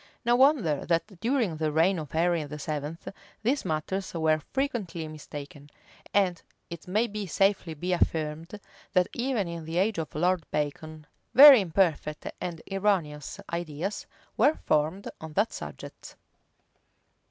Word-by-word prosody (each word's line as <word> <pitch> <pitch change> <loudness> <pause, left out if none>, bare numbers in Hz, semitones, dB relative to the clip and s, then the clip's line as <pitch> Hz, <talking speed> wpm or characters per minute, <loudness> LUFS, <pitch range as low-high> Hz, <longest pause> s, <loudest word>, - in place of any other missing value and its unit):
No 240 +1 +4
wonder 245 - +3
that 175 +3 -1
during 230 - 0
the 155 -1 0
reign 165 +4 +3
of 150 -3 -7
Henry 170 0 +1
VII.[*,] 150 +1 -5 0.5
these 270 +5 +1
matters 185 +3 -3
were 160 -1 +2
frequently 215 - -2
mistaken; 145 -1 -9 0.4
and 185 -4 +2 0.3
it 170 0 -8
may 210 +1 -1
safely 195 -2 +1
be 180 +4 -2
affirmed, 165 +2 -1 0.3
that 180 -2 +3
even 240 -6 -1
in 170 -1 -6
the 165 +2 -4
age 195 0 +1
of 160 - -5
Lord 175 +2 +1
Bacon, 155 +1 -4 0.3
very 275 -3 +11
imperfect 165 -4 0 0.2
and 170 -3 -5
erroneous 185 -8 -1
ideas 170 +3 -4 0.3
were 305 - +4
formed 155 +6 +1
on 160 -1 -8
that 205 +7 +1
subject. - - -9
170 Hz, 130 wpm, -27 LUFS, 155-200 Hz, 0.5 s, very